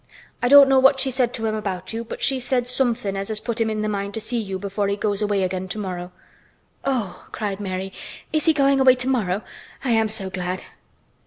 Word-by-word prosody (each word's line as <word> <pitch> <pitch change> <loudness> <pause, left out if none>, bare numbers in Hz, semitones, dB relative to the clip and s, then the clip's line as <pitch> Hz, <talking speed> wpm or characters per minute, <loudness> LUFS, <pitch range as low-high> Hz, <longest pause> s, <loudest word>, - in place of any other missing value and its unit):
I 245 - +2
don't 280 +1 +9
know 270 -1 +5
what 270 +1 +5
she 265 - +2
said 250 -2 +1
to 225 - -3
him 220 - 0
about 190 -3 -4
you 230 +1 -3
but 230 - -7
she 270 -1 +2
said 250 -1 0
somethin' 245 -5 -1
as 195 +2 -2
put 235 +1 -3
him 225 - +2
in 215 -1 -2
th' - - 0
mind 200 0 -3
to - - -2
see 235 +2 -2
you 195 -3 -4
before 200 +1 -2
he 200 - 0
goes 205 -1 -1
away 205 -2 +1
again, 185 0 -2
tomorrow." 185 -3 -5 0.7
"Oh!" 245 -9 -2
cried 205 -2 -3
Mary, 190 -1 -4 0.4
"is 310 -1 +1
he 325 - +6
going 275 -2 +3
away 260 -1 +6
tomorrow? 240 -7 0 0.4
I 260 - 0
am 225 -1 +3
so 205 -3 -1
glad!" 180 0 -3
215 Hz, 220 wpm, -23 LUFS, 195-250 Hz, 0.7 s, don't